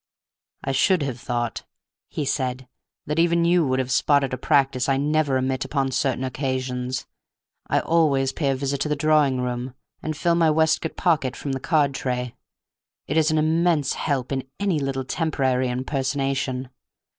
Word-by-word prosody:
"I 135 - -1
should 160 +5 +3
have 130 -3 -4
thought," 120 -1 -2 0.5
he 150 - -3
said, 130 -1 -2 0.4
"that 150 +2 -1
even 170 0 +3
you 170 -3 +3
would 130 0 +1
have 130 -1 -1
spotted 140 0 +2
a - - -1
practice 135 -3 +2
I 135 - +3
never 145 -1 +1
omit 130 0 -1
upon 135 -2 -1
certain 130 -1 0
occasions. 130 -1 -3 0.6
I - - +2
always 140 -5 +2
pay 145 -4 0
a 135 - +1
visit 140 +1 -2
to 150 - 0
the 150 - +1
drawing 145 -3 +2
room, 125 +1 -3 0.3
and 155 -1 -4
fill 170 +1 +2
my 165 -1 +3
waistcoat 160 +1 +1
pocket 150 -8 +1
from 140 - -4
the 135 - -2
card 145 -1 +2
tray. 125 -2 -3 0.7
It 145 - -3
is 160 0 +4
an 155 - +1
immense 160 -2 +2
help 135 -4 -2
in 135 -1 -3
any 195 -6 +1
little 135 -1 -2
temporary 130 -5 0
impersonation. 130 0 -2
135 Hz, 170 wpm, -23 LUFS, 130-155 Hz, 0.7 s, is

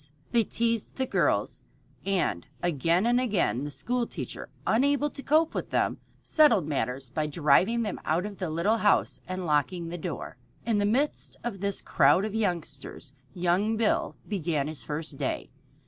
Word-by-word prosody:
They 235 -2 +4
teased 230 +1 -1
the 265 - 0
girls, - - 0 0.4
and 185 - 0 0.2
again 170 - +2
and 245 +1 +3
again 190 - 0
the - - -4
school 240 - -1
teacher, - - -6 0.2
unable 285 +5 +2
to - - -8
cope 315 +3 +3
with - - -3
them, - - 0 0.2
settled 235 - +4
matters 130 -2 -2
by 150 +4 -1
driving 170 +10 +3
them 210 - -4
out 170 +5 0
of 205 -2 -7
the 180 -4 -2
little 170 +8 +1
house 210 -2 +2
and 185 0 -4
locking 165 +3 0
the 175 +1 -5
door. - - -5 0.3
In 225 -3 +2
the 205 - +2
midst 270 +8 0
of 230 -5 -4
this 200 0 -1
crowd 150 +8 +4
of 215 - -4
youngsters 175 -8 -3 0.2
young 185 +5 +1
Bill 225 -1 +1
began 165 -8 -1
his 155 -1 -5
first 150 -1 -4
day. - - -3
190 Hz, 165 wpm, -28 LUFS, 155-230 Hz, 0.4 s, They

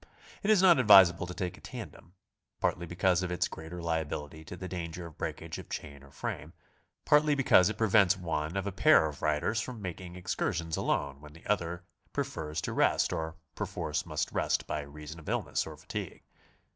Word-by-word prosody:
It 205 - -1
is 210 -4 +5
not 175 -6 +7
advisable 95 -7 +7
to 90 - -6
take 95 -1 -4
a - - -21
tandem, 115 -7 -9 0.5
partly 85 - 0
because 90 +1 +2
of 90 -1 -3
its 90 - +1
greater 85 +2 -8
lia 80 -1 0
bility 75 +1 -6
to 90 - -7
the 95 - -6
danger 85 -1 -5
of 80 -3 -11
breakage - - -4
of - - -11
chain 70 -2 -6
or 70 - -15
frame, - - -5 0.5
partly 150 0 +5
be 135 - 0
cause 90 -6 +6
it 110 - -4
prevents 105 -3 +4
one 80 -1 -2
of 100 - -1
a 100 - -2
pair 90 -4 +5
of 75 -3 -5
riders 75 +9 +1
from 125 0 -6
making 90 -2 -6
excur 90 0 -1
sions 80 -1 -2
alone 70 0 -1
when 75 0 -12
the 80 - -16
other 90 -4 -1 0.3
prefers 75 0 -3
to - - -3
rest - - +2
or 80 0 -3 0.2
perforce 90 -6 -3
must 75 -2 -2
rest - - 0
by 75 - -2
reason 75 +2 -9
of 80 - -9
illness - - -1
or - - -9
fatigue. - - -6
85 Hz, 200 wpm, -30 LUFS, 80-95 Hz, 0.5 s, not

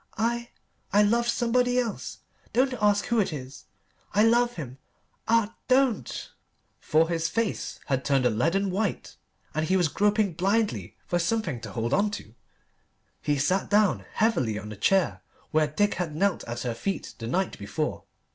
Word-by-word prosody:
I 235 +1 0 0.4
I 205 +2 +5
love 235 +3 +2
somebody 245 +1 +2
else. 235 -4 -2 0.3
Don't 255 +2 +3
ask 205 -1 +3
who 235 -1 +1
it 195 -3 +1
is. 135 -3 -8 0.5
I 210 - +5
love 240 +1 +4
him. 135 -5 -7 0.5
Ah 230 -1 +3
don't!" 255 - +1 0.5
For 160 +2 +3
his 165 -1 -1
face 225 +5 -2
had 135 -2 0
turned 135 -2 +2
a 125 - +4
leaden 170 - +1
white, 200 +1 -2 0.4
and 155 +1 -1
he 190 - +3
was 175 -4 +2
groping 205 +1 +2
blindly 200 +6 0
for 175 - 0
something 170 - -1
to - - -8
hold 115 +2 -1
on 205 +2 +3
to. 110 - -13 0.9
He 145 -1 0
sat 185 +8 +1
down 210 -1 +3
heavily 130 - +1
on 105 - -7
the 105 - -7
chair 100 - +2 0.3
where 155 -1 +3
Dick 205 +8 +1
had 165 -4 -3
knelt 195 +3 +1
at 120 0 -5
her 120 -2 -2
feet 195 +12 -4
the 115 - -5
night 185 +9 -1
before. 130 +10 -3
190 Hz, 165 wpm, -27 LUFS, 145-220 Hz, 0.9 s, I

